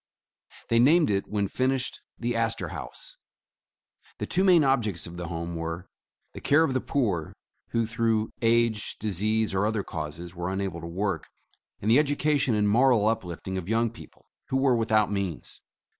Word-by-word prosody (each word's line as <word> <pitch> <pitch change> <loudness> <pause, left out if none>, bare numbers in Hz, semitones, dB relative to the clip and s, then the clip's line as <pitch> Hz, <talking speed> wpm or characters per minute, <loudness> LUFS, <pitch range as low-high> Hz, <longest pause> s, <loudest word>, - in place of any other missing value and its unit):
They 115 - +4
named 150 +2 +5
it, 100 -1 0
when 100 -1 -1
finished, 130 +4 -1 0.2
the 120 +1 -2
Astorhaus. 115 -1 -3 1.0
The - - -3
two 185 - +1
main 180 -5 +6
objects 120 -9 +1
of 85 - -9
the 90 -1 -5
Home 85 0 -4
were, 85 +2 -5 0.4
the - - -9
care 145 +3 +4
of 140 - 0
the 130 - 0
poor, 100 - -1 0.3
who, 115 -1 0
through 110 -1 0
age, 115 -2 +2
disease, 110 +1 0
or 95 +1 +1
other 110 -2 -1
causes, 80 +1 -6
were 90 0 -4
unable 95 -3 -3
to 85 - -6
work; 95 +3 -2 0.6
and 110 - +2
the 125 - +7
education 145 -3 +1
and 105 -1 +2
moral 120 0 +4
uplifting 95 -3 -2
of 90 +1 -8
young 115 0 +1
people, 115 - -15 0.2
who 130 - 0
were 135 -2 +3
without 110 -2 +2
means. 100 -5 -4
110 Hz, 165 wpm, -27 LUFS, 95-120 Hz, 1.0 s, the